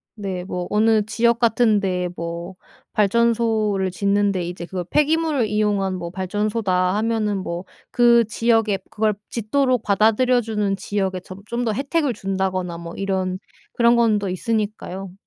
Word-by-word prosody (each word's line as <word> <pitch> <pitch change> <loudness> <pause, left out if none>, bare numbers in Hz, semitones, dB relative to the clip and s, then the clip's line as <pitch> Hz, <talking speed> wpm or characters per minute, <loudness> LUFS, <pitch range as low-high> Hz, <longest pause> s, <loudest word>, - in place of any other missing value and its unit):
네. 195 -4 -4
뭐 180 -1 -4
어느 220 +1 +3
지역 235 +1 +2
같은 230 -2 +3
데에 180 -2 -1
뭐 170 +2 -6 0.4
발전소를 215 -2 +2
짓는데 200 0 +1
이제 175 0 -6
그거 180 -1 -4
"폐기물을 300 - +1
이용한 205 -3 0
뭐 170 -1 -5
발전소다." 190 -1 0
하면은 215 -2 0
뭐 175 -1 -5 0.2
그 235 -1 +5
지역에 225 -1 +1
그걸 215 0 +1 0.2
짓도록 250 +2 +1
받아들여 225 +5 +3
주는 210 -3 -1
지역에 190 -2 -2
점 185 +1 -11
좀 240 +1 -2
더 220 - +1
혜택을 280 +2 0
준다거나 190 -3 -2
뭐 170 0 -8
이런 190 -1 -2 0.3
그런 235 0 +4
건 225 -3 +3
더 200 - -3
있으니까요. 195 -2 -3
210 Hz, 305 characters per minute, -22 LUFS, 190-230 Hz, 0.4 s, 그